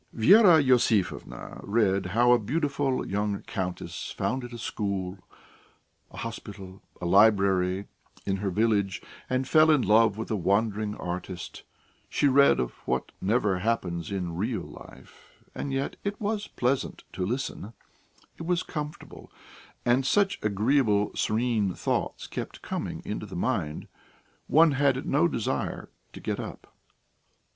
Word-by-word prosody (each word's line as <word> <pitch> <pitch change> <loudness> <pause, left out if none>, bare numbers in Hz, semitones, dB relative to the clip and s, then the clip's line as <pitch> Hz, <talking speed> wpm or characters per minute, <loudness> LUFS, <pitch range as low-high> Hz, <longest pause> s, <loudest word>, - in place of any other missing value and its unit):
Vera 175 - +7
Iosifovna 125 - +1
read 100 -3 +1
how 120 +6 +3
a 125 - +6
beautiful 140 +2 -1
young 105 0 -2
countess 90 -1 -4
founded 120 +5 -3
a 120 - -7
school, 100 -4 -3 0.9
a - - -13
hospital, 95 0 -8 0.2
a - - -5
library, 95 -1 +4 0.4
in 95 0 0
her 100 0 -2
village, 100 -2 +1 0.3
and 130 0 0
fell 155 +1 +5
in 150 -4 +4
love 110 -1 +4
with 110 - -5
a - - +2
wandering 105 +2 0
artist; 90 0 -6 0.5
she 145 - +2
read 140 +1 +5
of 60 -1 -1 0.2
what 65 0 -1
never 100 -2 +1
happens 90 -6 -1
in 90 -4 -3
real 110 +6 -2
life, - - -15
and 140 - -4
yet 135 +1 -2
it 200 0 -3
was 210 0 -2
pleasant 130 +2 -1
to 95 - -3
listen 115 0 -3 0.7
it 165 - -6
was 180 0 +1
comfortable, 150 -2 -7 0.5
and 120 +2 +3
such 195 +8 +2
agreeable, 105 0 +2
serene 110 -4 0
thoughts - - -2
kept - - -7
coming - - -4
into - - -4
the - - -9
mind, 75 0 -2 0.6
one 160 +1 +5
had 135 -1 +1
no 150 +5 +3
desire 115 - -3 0.2
to - - -10
get - - -3
up. - - -8
110 Hz, 135 wpm, -27 LUFS, 95-135 Hz, 0.9 s, Vera